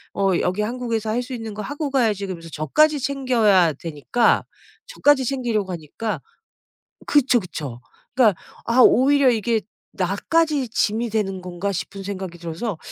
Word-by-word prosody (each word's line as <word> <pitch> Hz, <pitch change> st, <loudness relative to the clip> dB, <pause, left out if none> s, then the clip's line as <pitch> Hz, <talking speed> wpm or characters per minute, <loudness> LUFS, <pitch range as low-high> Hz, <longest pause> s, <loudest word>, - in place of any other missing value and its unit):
어 195 Hz, -1 st, +2 dB
여기 185 Hz, +4 st, 0 dB
한국에서 230 Hz, -1 st, -2 dB
할 240 Hz, +3 st, 0 dB
수 255 Hz, -, -8 dB
있는 225 Hz, -3 st, -6 dB
거 210 Hz, -, -6 dB
하고 285 Hz, +5 st, -4 dB
가야지." 220 Hz, -7 st, +1 dB
그러면서 165 Hz, -3 st, -7 dB
저까지 290 Hz, -, +2 dB
챙겨야 235 Hz, -, +3 dB
되니까 165 Hz, -, +1 dB, 0.4 s
저까지 290 Hz, -, +3 dB
챙기려고 235 Hz, -7 st, -1 dB
하니까 175 Hz, +7 st, -5 dB, 0.9 s
그쵸, 270 Hz, -4 st, +3 dB
그쵸. 150 Hz, -, -7 dB, 0.3 s
그러니까 225 Hz, -8 st, +3 dB, 0.3 s
'아 235 Hz, +2 st, +1 dB
오히려 275 Hz, +3 st, +5 dB
이게 225 Hz, -1 st, +1 dB, 0.3 s
나까지 275 Hz, -, 0 dB
짐이 225 Hz, +1 st, 0 dB
되는 195 Hz, -4 st, -2 dB
건가?' 180 Hz, +2 st, -3 dB
싶은 195 Hz, +1 st, -5 dB
생각이 190 Hz, -3 st, -6 dB
들어서 170 Hz, +3 st, -4 dB
220 Hz, 330 characters per minute, -22 LUFS, 185-255 Hz, 0.9 s, 오히려